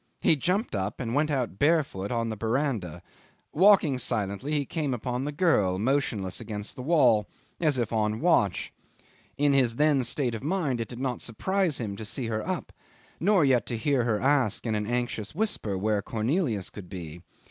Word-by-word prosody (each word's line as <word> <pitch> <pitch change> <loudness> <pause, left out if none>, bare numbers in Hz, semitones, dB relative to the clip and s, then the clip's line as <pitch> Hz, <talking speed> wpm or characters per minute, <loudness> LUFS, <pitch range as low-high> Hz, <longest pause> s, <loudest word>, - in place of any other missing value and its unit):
He 160 - +4
jumped 180 - -1
up, 100 0 -2
and 115 -2 -3
went 150 +3 +2
out 125 -9 -2
barefooted 145 - +1
on 115 -1 -1
the 110 - -3
verandah. 110 - -2 0.5
Walking 175 -7 +5
silently, 115 +1 -2
he 145 -2 0
came 145 -3 -2
upon 125 +2 -3
the 150 - -2
girl, 140 - +2
motionless 110 -5 -1
against 105 -1 -6
the - - -7
wall, 125 - +3 0.3
as 150 -5 +2
if 120 -2 -1
on 105 -1 +1
the - - -4
watch. 115 - +1 0.6
In 145 0 +3
his 125 -4 +3
then 145 -1 +3
state 125 0 0
of 115 - -5
mind 145 -6 -1
it 115 - -3
did 120 - -9
not 130 -2 -3
surprise 180 - -1
him 105 -4 -3
to 110 - -6
see 120 +4 -3
her 110 -1 -2
up, - - -3 0.5
nor 190 -3 +4
yet 130 -3 +2
to 120 - -2
hear 135 +1 +1
her 110 -3 +1
ask 135 -4 +2
in 110 - 0
an 105 -1 -1
anxious 120 -1 -2
whisper 165 - -1
where 105 +1 0
Cornelius 115 - -1
could 95 -4 -10
be. 85 -2 -8
125 Hz, 190 wpm, -27 LUFS, 105-145 Hz, 0.6 s, Walking